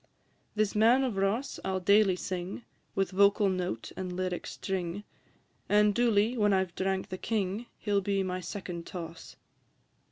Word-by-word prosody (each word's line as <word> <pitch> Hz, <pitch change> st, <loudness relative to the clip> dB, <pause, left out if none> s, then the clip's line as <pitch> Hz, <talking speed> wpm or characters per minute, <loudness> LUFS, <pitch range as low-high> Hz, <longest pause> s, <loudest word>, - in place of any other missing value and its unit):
V. -, -, -36 dB, 0.6 s
This 210 Hz, -, -3 dB
Man 230 Hz, +5 st, +5 dB
of 250 Hz, -6 st, -1 dB
Ross 200 Hz, +8 st, -1 dB
I -, -, -2 dB
'll 190 Hz, 0 st, 0 dB
daily 200 Hz, +1 st, +4 dB
sing, 185 Hz, +4 st, -5 dB, 0.3 s
With 195 Hz, 0 st, 0 dB
vocal 200 Hz, +1 st, +4 dB
note 180 Hz, -11 st, -3 dB
and 185 Hz, -1 st, -4 dB
lyric 180 Hz, 0 st, -3 dB
string, 190 Hz, +1 st, -3 dB, 0.7 s
And 210 Hz, 0 st, +5 dB
duly, 230 Hz, 0 st, +3 dB
when 210 Hz, -3 st, +3 dB
I 190 Hz, 0 st, +3 dB
've 175 Hz, -, -21 dB
drank 190 Hz, +1 st, -1 dB
the 185 Hz, -, -5 dB
king, 215 Hz, +1 st, -2 dB
He 210 Hz, -, -4 dB
'll 200 Hz, -, +4 dB
be 195 Hz, 0 st, 0 dB
my 185 Hz, 0 st, -2 dB
second 180 Hz, -2 st, -6 dB
toss. 165 Hz, -2 st, -8 dB
195 Hz, 170 wpm, -30 LUFS, 185-210 Hz, 0.7 s, Man